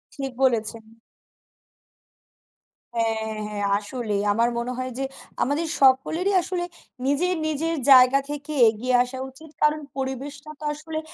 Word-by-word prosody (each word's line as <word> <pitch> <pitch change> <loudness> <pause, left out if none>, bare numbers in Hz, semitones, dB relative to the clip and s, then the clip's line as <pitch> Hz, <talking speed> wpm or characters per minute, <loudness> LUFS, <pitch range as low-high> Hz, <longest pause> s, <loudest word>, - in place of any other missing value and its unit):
ঠিক 270 -2 -4
বলেছেন। 230 -3 +1 2.1
হ্যাঁ, 220 -1 -1
হ্যাঁ। 205 -1 -4 0.2
আসলেই। 210 -2 -3
আমার 230 +3 +2
মনে 240 +1 -2
হয় 255 0 -3
যে 270 - -2 0.4
আমাদের 295 +5 -1
সকলেরই 295 +9 +3
আসলে 350 0 -3 0.4
নিজের, 285 +7 +2
নিজের 315 +2 -1 0.2
জায়গা 255 +1 +8
থেকে 295 +1 -5 0.2
এগিয়ে 240 +4 -2
আসা 255 +1 -7
উচিত। 310 +4 -15
কারণ 300 0 +3 0.2
পরিবেশটা 275 +3 -5
তো - - -11
আসলে 315 +1 -5
265 Hz, 125 wpm, -24 LUFS, 235-305 Hz, 2.1 s, জায়গা